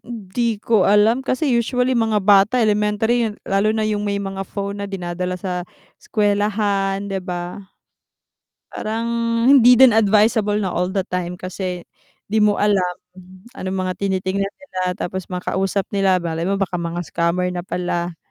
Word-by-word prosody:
Hindi 230 Hz, 0 st, -3 dB
ko 225 Hz, 0 st, +2 dB
alam 215 Hz, +5 st, +4 dB
kasi 265 Hz, +1 st, 0 dB
usually 250 Hz, +2 st, +1 dB
mga 220 Hz, -2 st, +2 dB
bata, 200 Hz, +4 st, +5 dB
elementary, 220 Hz, +2 st, +1 dB, 0.2 s
lalo 195 Hz, +2 st, +1 dB
na 220 Hz, -, 0 dB
yung 210 Hz, -1 st, -1 dB
may 205 Hz, -1 st, -1 dB
mga 195 Hz, -1 st, -5 dB
phone 200 Hz, 0 st, -4 dB
na -, -, -3 dB
dinadala 180 Hz, -1 st, -4 dB
sa 180 Hz, -1 st, -3 dB, 0.4 s
eskuwelahan, 205 Hz, -2 st, 0 dB
'di 190 Hz, -, -2 dB
ba? 180 Hz, +1 st, -5 dB, 1.1 s
Parang 225 Hz, +2 st, -3 dB, 0.4 s
hindi 250 Hz, -3 st, +7 dB
din 260 Hz, -2 st, +8 dB
advisable 210 Hz, 0 st, +3 dB
na 190 Hz, -4 st, -2 dB
all 180 Hz, +1 st, 0 dB
the 190 Hz, -1 st, -1 dB
time 180 Hz, -1 st, -3 dB
kasi 185 Hz, -1 st, -5 dB, 0.4 s
'di 215 Hz, +1 st, 0 dB
mo 210 Hz, -1 st, +3 dB
alam, 190 Hz, -4 st, +1 dB, 0.6 s
anong 190 Hz, +1 st, -4 dB
mga 185 Hz, -, -1 dB
tinitingnan 195 Hz, 0 st, -1 dB
nila 280 Hz, -11 st, -7 dB, 0.2 s
tapos 185 Hz, 0 st, -4 dB
makausap 190 Hz, +2 st, -1 dB
nila, 195 Hz, -2 st, +3 dB
malay 165 Hz, -1 st, -3 dB
mo 200 Hz, -, +1 dB
baka 195 Hz, -2 st, -2 dB
mga 170 Hz, +1 st, -3 dB
scammer 180 Hz, +2 st, 0 dB
na 175 Hz, -, -3 dB
pala. 175 Hz, -2 st, -3 dB
200 Hz, 150 wpm, -20 LUFS, 185-215 Hz, 1.1 s, din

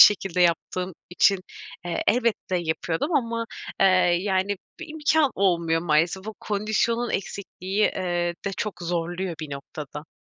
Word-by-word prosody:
şekilde 190 Hz, -3 st, +6 dB
yaptığım 180 Hz, +2 st, +1 dB, 0.2 s
için, 195 Hz, +2 st, +4 dB, 0.5 s
eee, 175 Hz, -, -1 dB
elbette 235 Hz, -5 st, +2 dB
yapıyordum 170 Hz, -, -1 dB
ama, 230 Hz, -4 st, +1 dB, 0.4 s
eee, 195 Hz, -, +7 dB, 0.3 s
yani, 195 Hz, +1 st, 0 dB, 0.2 s
bir 345 Hz, -, -7 dB
imkân 310 Hz, -1 st, +2 dB
olmuyor 170 Hz, -4 st, +2 dB
maalesef. 170 Hz, +4 st, +1 dB
O 220 Hz, -, -5 dB
kondisyonun 220 Hz, +3 st, 0 dB
eksikliği, 195 Hz, 0 st, -2 dB
eee, 175 Hz, -2 st, 0 dB
de 195 Hz, -, -1 dB
çok 210 Hz, -3 st, -3 dB
zorluyor 175 Hz, +1 st, -2 dB
bir 155 Hz, -2 st, -6 dB
noktada. 145 Hz, +2 st, -7 dB
185 Hz, 130 wpm, -25 LUFS, 170-215 Hz, 0.5 s, eee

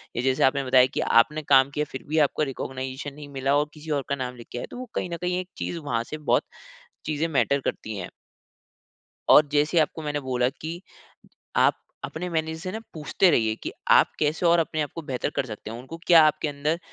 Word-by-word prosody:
या 120 Hz, -, 0 dB
जैसे 130 Hz, 0 st, +2 dB
आपने 140 Hz, +1 st, +3 dB
बताया 130 Hz, -1 st, +5 dB
कि -, -, 0 dB, 0.2 s
आपने 150 Hz, +5 st, -4 dB
काम 135 Hz, 0 st, +7 dB
किया, 150 Hz, +1 st, -1 dB
फिर 130 Hz, -, -6 dB
भी 155 Hz, +2 st, -1 dB
आपको 155 Hz, -, -2 dB
रिकॉग्नाइजेशन 130 Hz, +2 st, -5 dB
नहीं 145 Hz, -1 st, -10 dB
मिला 135 Hz, +2 st, +2 dB
और 150 Hz, +1 st, 0 dB
किसी 155 Hz, +1 st, -11 dB
और -, -, -5 dB
का 140 Hz, -, +1 dB
नाम 125 Hz, -2 st, -5 dB
लिख 120 Hz, -1 st, -12 dB
के -, -, -5 dB
आया। -, -, -5 dB
तो -, -, -8 dB
वो 255 Hz, -1 st, -7 dB
कही 180 Hz, -, -2 dB
न 170 Hz, -, -4 dB
कही 180 Hz, 0 st, 0 dB
एक 185 Hz, 0 st, -6 dB
चीज़ 175 Hz, -, -3 dB
वहाँ 120 Hz, -7 st, -2 dB
से 155 Hz, -, -7 dB
बहुत -, -, +4 dB, 0.6 s
चीज़ें 155 Hz, +2 st, -1 dB
मैटर 140 Hz, -2 st, +2 dB
करती 110 Hz, -4 st, -4 dB
हैं। 90 Hz, -3 st, -5 dB, 1.2 s
और 150 Hz, -, +8 dB
जैसे 150 Hz, +3 st, +3 dB
आपको 160 Hz, +1 st, 0 dB
मैंने 145 Hz, -1 st, -2 dB
बोला 125 Hz, -2 st, 0 dB
कि 165 Hz, +3 st, -5 dB, 0.8 s
आप -, -, +3 dB, 0.2 s
अपने 175 Hz, +3 st, -4 dB
मैनेजर 160 Hz, -1 st, -2 dB
से 185 Hz, +2 st, -5 dB
ना 220 Hz, -, -4 dB
पूछते 160 Hz, +4 st, +2 dB
रहिए 110 Hz, -7 st, +2 dB
कि -, -, -4 dB, 0.2 s
आप -, -, +6 dB
कैसे 155 Hz, +3 st, +1 dB
और 170 Hz, 0 st, +5 dB
अपने 155 Hz, -1 st, 0 dB
आप 145 Hz, -, -4 dB
को 165 Hz, -, -5 dB
बेहतर 135 Hz, -2 st, -3 dB
कर 130 Hz, -, 0 dB
सकते 110 Hz, -2 st, -8 dB
हो, 115 Hz, -, -6 dB
उनको 135 Hz, +7 st, -9 dB
क्या 165 Hz, -2 st, +8 dB
आपके 155 Hz, 0 st, 0 dB
अंदर 145 Hz, +3 st, -1 dB
150 Hz, 225 wpm, -25 LUFS, 130-160 Hz, 1.2 s, और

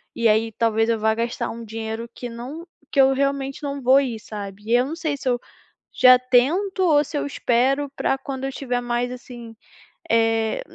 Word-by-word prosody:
E 230 Hz, -, +2 dB
aí, 225 Hz, +1 st, +2 dB
talvez 225 Hz, 0 st, +1 dB
eu 225 Hz, -1 st, +1 dB
vá 220 Hz, 0 st, +2 dB
gastar 235 Hz, +1 st, -2 dB
um 230 Hz, 0 st, -7 dB
dinheiro 225 Hz, +1 st, -5 dB
que 245 Hz, -, -7 dB
não 265 Hz, +9 st, -8 dB, 0.2 s
que 275 Hz, -, +4 dB
eu 270 Hz, 0 st, +5 dB
realmente 275 Hz, +1 st, -2 dB
não 280 Hz, -1 st, -4 dB
vou 260 Hz, +2 st, +5 dB
ir, 240 Hz, -5 st, -3 dB
sabe, 205 Hz, -2 st, -8 dB
e 235 Hz, -, +2 dB
eu 245 Hz, +1 st, +3 dB
não 315 Hz, +4 st, -5 dB
sei 310 Hz, -4 st, -2 dB
se 270 Hz, -, -7 dB
eu 245 Hz, -1 st, +1 dB, 0.5 s
já 255 Hz, 0 st, +7 dB
tento 280 Hz, +11 st, +1 dB
ou 300 Hz, -4 st, +4 dB
se 290 Hz, -, -4 dB
eu -, -, -2 dB
espero 270 Hz, +2 st, +1 dB
pra 270 Hz, -, +1 dB
quando 270 Hz, -1 st, -6 dB
eu 270 Hz, -, -3 dB
tiver 250 Hz, -2 st, -2 dB
mais, 245 Hz, 0 st, -2 dB
assim, 240 Hz, -2 st, -10 dB, 0.6 s
eh, 225 Hz, -, +2 dB
245 Hz, 200 wpm, -22 LUFS, 230-275 Hz, 0.6 s, já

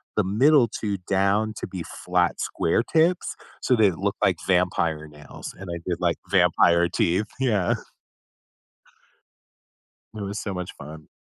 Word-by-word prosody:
the 105 Hz, -, +2 dB
middle 125 Hz, +7 st, +4 dB
2 105 Hz, -2 st, -3 dB
down 100 Hz, +3 st, +1 dB
to -, -, -5 dB
be 90 Hz, -3 st, -6 dB, 0.2 s
flat 90 Hz, -1 st, +1 dB
square 100 Hz, +7 st, 0 dB
tips, 165 Hz, +5 st, +1 dB, 0.3 s
so 125 Hz, -, +3 dB
they 105 Hz, -4 st, +4 dB
look 100 Hz, +4 st, -2 dB
like 95 Hz, -2 st, +4 dB
vampire 85 Hz, -4 st, +1 dB
nails. 75 Hz, -1 st, -10 dB
And 95 Hz, -1 st, -8 dB
I 85 Hz, -, -4 dB
did 90 Hz, -2 st, -1 dB
like 85 Hz, -2 st, +1 dB
vampire 85 Hz, -2 st, +4 dB
teeth. 90 Hz, +4 st, +1 dB
Yeah. 105 Hz, -9 st, +1 dB, 2.4 s
It 105 Hz, -, -6 dB
was 100 Hz, +1 st, -4 dB
so 100 Hz, -, -4 dB
much 90 Hz, 0 st, -5 dB
fun. 75 Hz, +1 st, -11 dB
95 Hz, 145 wpm, -24 LUFS, 85-105 Hz, 2.4 s, middle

